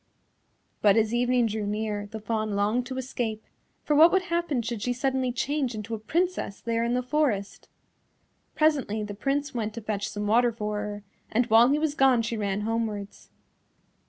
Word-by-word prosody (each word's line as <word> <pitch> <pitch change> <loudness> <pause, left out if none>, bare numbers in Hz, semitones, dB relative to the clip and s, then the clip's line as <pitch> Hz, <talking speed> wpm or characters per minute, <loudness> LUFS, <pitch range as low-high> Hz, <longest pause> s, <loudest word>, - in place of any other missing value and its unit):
But 205 0 +5
as 220 0 +2
evening 245 0 +2
drew 215 -1 -2
near 210 -1 -2
the 220 +1 -7
Fawn 215 -1 -2
longed 215 +5 +1
to 260 -1 -5
escape, 240 -4 -3 0.4
for 300 - +1
what 325 +3 +8
would 380 -1 +2
happen 340 -8 -1
should 230 -2 -4
she 245 +3 0
suddenly 260 0 0
change 260 0 -1
into 215 +1 -6
a 220 - -3
Princess 335 - -1
there 230 0 -1
in 235 +1 0
the 250 - 0
forest. 250 -7 -1 0.9
Presently 275 -9 +1
the 210 -1 -5
Prince 275 +6 -2
went 220 -3 -3
to 230 - -5
fetch 210 -1 -3
some 205 0 -4
water 235 +3 +3
for 210 -2 -3
her, 205 0 -5 0.3
and 240 +3 +2
while 230 +3 +7
he 285 - +3
was 305 -1 0
gone 265 -5 +4
she 230 +1 -2
ran 205 -2 -1
homewards. 215 -2 -3
230 Hz, 185 wpm, -27 LUFS, 210-260 Hz, 0.9 s, what